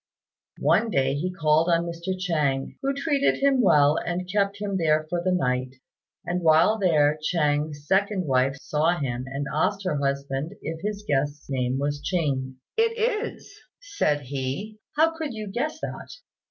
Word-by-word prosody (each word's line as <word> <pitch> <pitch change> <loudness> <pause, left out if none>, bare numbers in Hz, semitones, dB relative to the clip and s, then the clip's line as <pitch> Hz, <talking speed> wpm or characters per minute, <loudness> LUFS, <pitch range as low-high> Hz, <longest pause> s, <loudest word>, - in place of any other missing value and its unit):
One 230 - +3
day 135 -7 +1
he 165 +6 -2
called 160 -1 +2
on 170 0 +2
Mr. 170 +2 -4
Chêng, 150 -7 -1
who 275 - +1
treated 280 0 +1
him 275 -2 +3
well 150 -6 +5
and 175 +1 -3
kept 200 +1 0
him 200 -2 -2
there 155 -2 +2
for 175 +2 -2
the 185 - +1
night; 130 -6 0 0.5
and 180 +1 -1
while 165 +7 +4
there 155 -5 +3
Chêng's 150 -2 0
second 195 +1 +1
wife 135 -1 +2
saw 155 +4 +1
him, 130 -4 -3
and 140 +2 -4
asked 195 +6 0
her 180 -6 -1
husband 140 +3 -2
if 160 +1 -5
his 210 0 -4
guest's 145 +1 -1
name 130 -1 0
wasn't 145 +1 -2
Ching. 135 -7 -1 0.2
"It 455 0 +2
is," 455 0 -2 0.2
said 405 - 0
he, 140 +11 -4 0.2
"how 325 +1 +4
could 310 -7 -4
you 215 -1 -5
guess 285 +11 -3
that?" - - -6
165 Hz, 165 wpm, -25 LUFS, 145-200 Hz, 0.5 s, well